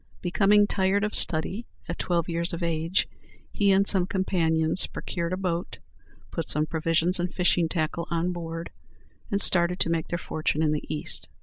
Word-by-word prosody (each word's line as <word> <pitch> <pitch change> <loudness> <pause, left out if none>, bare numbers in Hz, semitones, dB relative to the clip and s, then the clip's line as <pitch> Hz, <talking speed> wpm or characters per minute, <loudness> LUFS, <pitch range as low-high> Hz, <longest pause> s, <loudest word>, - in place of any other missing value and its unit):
Becoming 200 +3 +4
tired 200 0 +1
of 210 - -1
study, 185 +7 +1 0.2
at 170 - -5
twelve 170 -2 0
years 170 +1 -2
of 170 - -4
age, 165 +2 0 0.4
he 200 -1 +2
and 195 +1 +4
some 185 -3 +3
companions 165 -3 +1
procured 170 -1 -4
a 185 - -1
boat, 180 -2 -3 0.5
put 165 -3 -4
some 150 +1 +2
provisions 165 +3 +1
and 175 +1 -1
fishing 175 -2 +2
tackle 170 0 -2
on 170 +1 0
board, 165 -1 -5 0.6
and 200 -3 0
started 180 -2 +2
to 165 - +3
make 165 -1 -1
their 170 - -2
fortune 155 -2 -1
in 155 - +2
the 150 - -3
East. 155 - -3
170 Hz, 175 wpm, -26 LUFS, 165-185 Hz, 0.6 s, Becoming